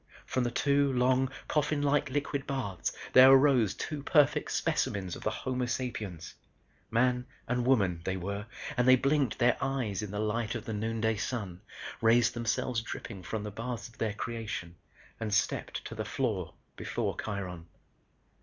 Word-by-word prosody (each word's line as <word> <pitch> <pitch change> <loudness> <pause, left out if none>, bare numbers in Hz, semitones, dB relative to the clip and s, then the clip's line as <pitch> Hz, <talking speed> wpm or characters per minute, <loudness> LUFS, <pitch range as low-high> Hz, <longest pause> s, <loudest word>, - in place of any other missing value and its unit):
From 130 - 0
the 120 - +1
two 140 +3 +2
long, 130 +1 +3 0.2
coffin 150 -1 +1
like 145 -1 +2
liquid 140 0 -2
baths, 110 -11 -2 0.2
there 130 +1 +10
arose 135 -6 +5
two 150 -2 -4
perfect 145 0 +3
specimens 95 -3 -1
of - - -9
the - - 0
Homo 125 -1 -2
sapiens. 110 -9 -4 0.6
Man 125 +1 +2 0.2
and 125 0 0
woman, 95 -10 +3
they 95 +1 -1
were, 100 +3 -4 0.3
and 125 0 +2
they 130 - +9
blinked 140 +1 +1
their 120 0 +3
eyes 125 -8 -1
in 105 - -5
the 105 - -5
light 110 +2 -1
of 115 -1 -5
the 110 - -4
noonday 110 +1 0
sun, 100 -5 -4 0.4
raised 115 0 +4
themselves 115 +1 -1
dripping 100 -3 -7
from 105 +5 -4
the 105 - -5
baths 115 +2 -5
of 115 - -22
their 110 -2 -1
creation 110 -7 -5 0.4
and 110 -2 -3
stepped - - -1
to - - -6
the - - -3
floor - - -2 0.2
before - - -2
Kiron. 90 -5 -5
115 Hz, 165 wpm, -30 LUFS, 105-130 Hz, 0.6 s, there